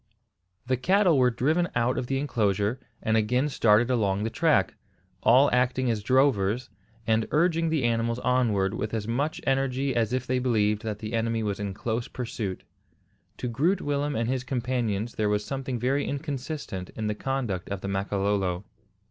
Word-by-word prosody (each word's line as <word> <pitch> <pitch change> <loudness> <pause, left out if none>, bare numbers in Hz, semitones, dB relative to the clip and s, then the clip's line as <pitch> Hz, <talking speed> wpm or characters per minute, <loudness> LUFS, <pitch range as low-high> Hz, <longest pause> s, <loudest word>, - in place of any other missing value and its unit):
The 130 0 +1
cattle 185 - +3
were 125 -1 +5
driven 155 +9 +1
out 120 +1 +2
of 125 -1 -3
the 135 - 0
enclosure, 110 -4 0 0.2
and 110 - +1
again 125 +6 +2
started 115 -1 +3
along 100 -4 +1
the 110 - -2
track, 155 - +2 0.5
all 130 +5 +6
acting 125 0 +2
as 110 -2 -2
drovers, 125 -1 +2 0.3
and 110 0 +1
urging 165 +1 +2
the 155 -4 0
animals 115 0 +1
onward 120 -6 +1
with 110 0 -3
as 105 -1 -3
much 140 +7 -1
energy 135 0 0
as 115 -3 +1
if 130 0 -1
they 130 0 0
believed 105 -4 +1
that 110 -3 -4
the 110 +1 -6
enemy 115 0 0
was 100 -2 -2
in 100 -2 -4
close 115 +2 -2
pursuit. 115 -6 -5 0.7
To 125 - -3
Groot 150 - +1
Willem 145 0 -1
and 115 0 0
his 130 0 -1
companions 120 -4 -2
there 105 -2 0
was 105 0 0
something 135 -2 -3
very 130 +5 0
inconsistent 140 - -4
in 110 - -3
the 105 - 0
conduct 120 -7 -3
of 100 -1 -4
the - - -4
Makololo. 100 -1 -1
120 Hz, 175 wpm, -27 LUFS, 105-135 Hz, 0.7 s, all